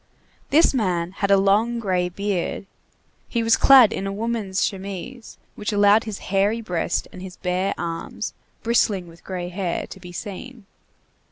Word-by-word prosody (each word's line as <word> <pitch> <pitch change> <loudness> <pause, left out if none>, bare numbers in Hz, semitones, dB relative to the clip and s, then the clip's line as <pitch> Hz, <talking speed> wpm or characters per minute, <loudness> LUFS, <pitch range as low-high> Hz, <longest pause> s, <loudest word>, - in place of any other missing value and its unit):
This 310 +1 +5
man 180 -8 0
had 200 +1 -2
a 200 - +6
long 210 +5 +2
gray 180 -5 0
beard. 200 0 -2 0.6
He 235 -2 -1
was 225 0 +5
clad 260 -6 +7
in 195 - -3
a - - -2
woman's 210 -2 -1
chemise, 200 +5 -6 0.2
which 210 +1 -4
allowed 205 +1 +4
his 215 -3 -5 0.2
hairy 200 +4 +2
breast 180 -7 -2
and 180 - -9
his 185 -1 -9
bare 185 +1 -1
arms, 170 +5 -4 0.3
bristling 215 -5 +1
with 165 0 -16
gray 180 -2 -5
hair, 180 -1 -2
to - - -11
be 180 -1 -10
seen. 210 +5 -8
195 Hz, 160 wpm, -23 LUFS, 180-225 Hz, 0.6 s, clad